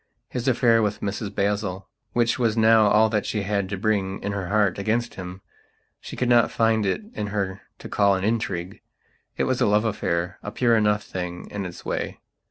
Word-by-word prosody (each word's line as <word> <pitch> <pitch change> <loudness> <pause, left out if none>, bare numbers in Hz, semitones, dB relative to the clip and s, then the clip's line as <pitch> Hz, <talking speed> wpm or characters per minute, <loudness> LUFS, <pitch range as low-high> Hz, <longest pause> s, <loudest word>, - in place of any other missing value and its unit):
His 125 0 -4
affair 115 -2 +4
with 105 0 -1
Mrs 100 0 -4
Basil, 100 -1 -1 0.3
which 120 +1 +1
was 115 -2 +1
now 110 -1 +6
all 105 +2 +5
that 105 -2 0
she 105 -2 -2
had 100 -1 -1
to 100 - -3
bring, 100 -2 0
in 100 - -2
her 100 -3 -3
heart, 100 -2 +1
against 115 +4 -1
him, 90 0 -8 0.6
she - - -9
could 125 - -1
not 120 -1 +5
find 110 -2 +2
it 95 - -1
in 105 - -3
her 100 -2 -3 0.2
to - - -9
call 100 -1 +3
an 95 - -3
intrigue. 100 -4 -2 0.6
It - - +1
was 130 0 0
a 120 - +4
love 105 +1 +3
affaira 90 -4 -1 0.2
pure 120 -2 +3
enough 105 -1 +2
thing 90 -1 -6
in 100 -2 -3
its 85 - -11
way. - - -3
105 Hz, 195 wpm, -24 LUFS, 95-115 Hz, 0.6 s, now